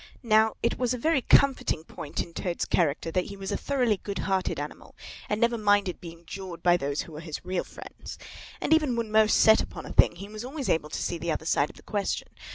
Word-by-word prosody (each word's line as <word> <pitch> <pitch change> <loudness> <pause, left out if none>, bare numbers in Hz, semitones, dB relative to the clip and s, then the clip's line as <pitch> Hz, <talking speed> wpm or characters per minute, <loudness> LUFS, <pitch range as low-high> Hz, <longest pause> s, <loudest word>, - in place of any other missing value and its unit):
Now, 220 -1 +4
it 235 - 0
was 250 0 +1
a - - -5
very 310 +3 +2
comforting 265 - +3
point 150 -2 -5
in 170 - -14
Toad's 175 -1 -2
character 165 -1 0
that 180 +1 0
he 200 - -8
was 195 0 -5
a - - 0
thoroughly 250 -7 +1
good 200 0 -6
hearted 190 -1 0
animal - - -8 0.3
and 210 - 0
never 235 0 +2
minded 205 -3 +2
being 170 -1 -10
jawed 185 -1 -8
by 175 -1 +5
those 140 -3 -1
who - - -13
were 150 - -8
his 160 0 -7
real 185 -1 -1
friends. - - -10 0.4
And - - +2
even 305 -6 +3
when 230 -2 -2
most 215 0 +5
set 220 0 +6
upon - - -7
a - - -7
thing, - - +5
he 195 +3 -8
was 215 +2 -8
always 270 +1 -4
able 150 -2 +1
to - - -4
see 170 - -2
the 170 +1 -2
other 160 - -3
side 150 -2 +2
of - - -14
the - - -16
question. 205 -2 -2
200 Hz, 240 wpm, -27 LUFS, 170-230 Hz, 0.4 s, set